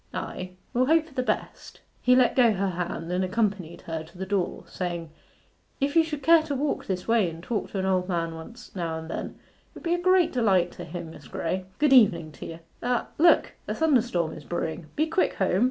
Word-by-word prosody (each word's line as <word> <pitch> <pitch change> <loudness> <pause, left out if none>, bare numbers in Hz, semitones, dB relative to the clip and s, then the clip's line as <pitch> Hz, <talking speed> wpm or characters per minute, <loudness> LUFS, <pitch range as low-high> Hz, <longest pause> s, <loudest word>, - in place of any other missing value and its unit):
Ay, 185 0 -5 0.2
we'll 255 +1 +2
hope 320 +1 +4
for 315 - -17
the 260 - 0
best.' 250 - -3 0.2
He 250 0 +5
let 255 -1 +4
go 240 -4 +5
her 195 -1 0
hand 175 -1 -4
and 180 +1 +1
accompanied 190 -4 -1
her 165 -1 -4
to 165 +3 -16
the 190 - -4
door 190 -2 -1
saying, 170 -3 -4 0.7
'If 280 +2 0
you 330 - +7
should 300 -3 -5
care 330 +3 +7
to 305 -3 -3
walk 280 +2 -1
this 185 -2 -3
way 225 -6 +3
and 165 +1 -10
talk 220 +1 -2
to - - -5
an 190 - 0
old 185 -1 +1
man 165 -2 -1
once 230 +10 -11
now 165 -3 -2
and 160 0 -7
then, - - -4
it - - -31
will - - -10
be 340 -1 +1
a 350 - +1
great 370 -1 +4
delight 195 -8 +2
to - - -8
him, 165 0 -7
Miss - - -13
Graye. 185 +3 -3
Good 295 -2 +4
evening 185 -11 +5
to 140 - -9
ye.... 165 0 -8 0.2
Ah 245 0 0
look! 335 +2 +5 0.2
a - - -2
thunderstorm 240 - +2
is 155 - -9
brewing 165 0 -4
be 310 - +2
quick 325 +3 +1
home. 190 -1 +1
195 Hz, 225 wpm, -26 LUFS, 170-260 Hz, 0.7 s, you